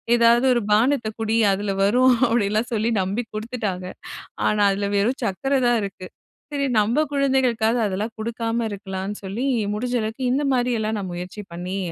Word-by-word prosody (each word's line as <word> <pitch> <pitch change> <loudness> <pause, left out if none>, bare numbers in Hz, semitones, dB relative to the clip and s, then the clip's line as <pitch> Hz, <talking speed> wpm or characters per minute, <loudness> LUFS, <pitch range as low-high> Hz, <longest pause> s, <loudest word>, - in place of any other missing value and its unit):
ஏதாவது 235 +2 +4
ஒரு 240 - +1
பானத்த 235 +2 +3
குடி, 220 0 0 0.2
அதில 200 +1 -2
வரும் 250 +5 +5 0.2
அப்படிலாம் 220 +1 +1
சொல்லி 220 +1 +1
நம்பி 200 +6 -2
குடுத்துட்டாங்க. 215 -5 -4 0.6
ஆனா, 210 0 +1
அதில 200 +1 -2
வெறும் 235 +7 +1
சக்கர 270 +8 -1
தான் 240 -1 +3
இருக்கு. 190 -2 -6 0.5
சரி, 280 -1 0
நம்ம 235 +9 +2
குழந்தைகளுக்காவது 250 -4 +2
அதெல்லாம் 205 +4 -3
குடுக்காம 230 +1 -2
இருக்கலாம்ன்னு 195 0 -5
சொல்லி, 210 +7 -3 0.3
முடிஞ்ச 245 +3 -3
அளவுக்கு 220 +4 -4
இந்த 285 +3 +1
மாரியெல்லாம் 230 -3 0
நான் 190 -2 -5
முயற்சி 180 +4 -6
பண்ணி, 180 +3 -4
220 Hz, 150 wpm, -23 LUFS, 200-245 Hz, 0.6 s, வரும்